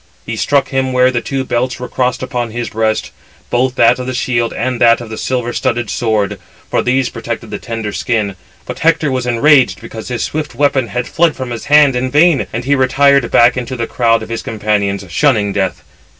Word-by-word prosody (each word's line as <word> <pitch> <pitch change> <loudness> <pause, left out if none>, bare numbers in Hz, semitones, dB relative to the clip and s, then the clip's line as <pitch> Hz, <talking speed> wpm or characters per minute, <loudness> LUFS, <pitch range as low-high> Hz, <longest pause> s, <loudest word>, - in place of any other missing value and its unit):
[He 110 - -4
struck 140 +5 +1
him] 130 -1 -1
where 125 0 +4
the 120 -2 -1
two 135 -1 -3
belts 125 0 -2
were 125 - -5
crossed 125 0 -1
upon 125 -2 -3
his 120 +1 -4
breast, 110 0 -1 0.4
both 125 +1 +1
that 120 +1 +4
of 125 - -5
the 130 - -3
shield 120 -2 0
and 125 0 -3
that 115 -1 +5
of 120 -2 -9
the - - -4
silver 125 -2 -2
studded 120 -4 -1
sword; 105 -3 -1 0.3
for - - +2
these 130 0 +1
protected 115 -1 -6
the 105 - -4
tender 115 -3 -5
skin: 105 -5 -1 0.3
but - - -7
Hector 160 -3 +2
was 130 -1 -2
enraged 125 -5 +3
because 110 +2 -9
his 125 -2 -3
swift 150 -4 -4
weapon 135 -2 +1
had 125 +1 -3
fled 165 -2 +1
from 130 -2 -6
his 115 - -6
hand 145 -2 +5
in 125 +1 -1
vain, 150 +1 +3
and 120 +2 -4
he 140 - +2
retired 140 -1 +3
back 120 +1 +5
into 125 0 -4
the 115 -2 -2
crowd 115 -1 +1
of - - -9
his 115 -1 -3
companions, 105 -2 -1
shunning 105 - +1
death. 95 -2 -2
120 Hz, 210 wpm, -15 LUFS, 115-130 Hz, 0.4 s, that